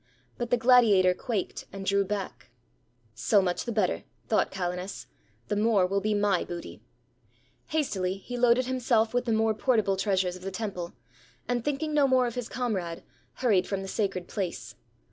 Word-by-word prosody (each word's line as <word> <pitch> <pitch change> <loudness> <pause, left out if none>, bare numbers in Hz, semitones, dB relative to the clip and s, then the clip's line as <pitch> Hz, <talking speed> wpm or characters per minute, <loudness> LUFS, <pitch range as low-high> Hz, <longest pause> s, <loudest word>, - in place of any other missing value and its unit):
But 240 -2 -4
the 245 - +3
gladiator 225 -7 +5
quaked, 200 +1 -3
and 195 0 -7
drew 200 +1 +3
back. 190 - -5 0.6
"So 160 - +3
much 180 -2 -1
the 240 - -2
better," 210 -5 0 0.2
thought 220 - +2
Calenus; 180 0 -4 0.4
"the - - -1
more 210 -2 +3
will 195 +2 0
be 215 +1 0
my 205 -3 +2
booty." 175 -1 -8 0.9
Hastily 195 -12 -1
he 245 +5 -7
loaded 245 +1 +4
himself 240 -3 +1
with 245 0 +1
the 235 - 0
more 220 0 +2
portable 215 -3 +1
treasures 190 -2 +1
of 185 - -11
the 190 - -4
temple; 190 -4 -5 0.5
and 245 -1 -1
thinking 295 +3 -2
no 290 -2 +4
more 260 -1 +4
of 240 - -3
his 245 -1 -4
comrade, 190 -9 -3 0.3
hurried 205 -8 +2
from 195 -1 -2
the - - -6
sacred 190 -3 -2
place. 190 -5 -4
205 Hz, 170 wpm, -28 LUFS, 185-240 Hz, 0.9 s, gladiator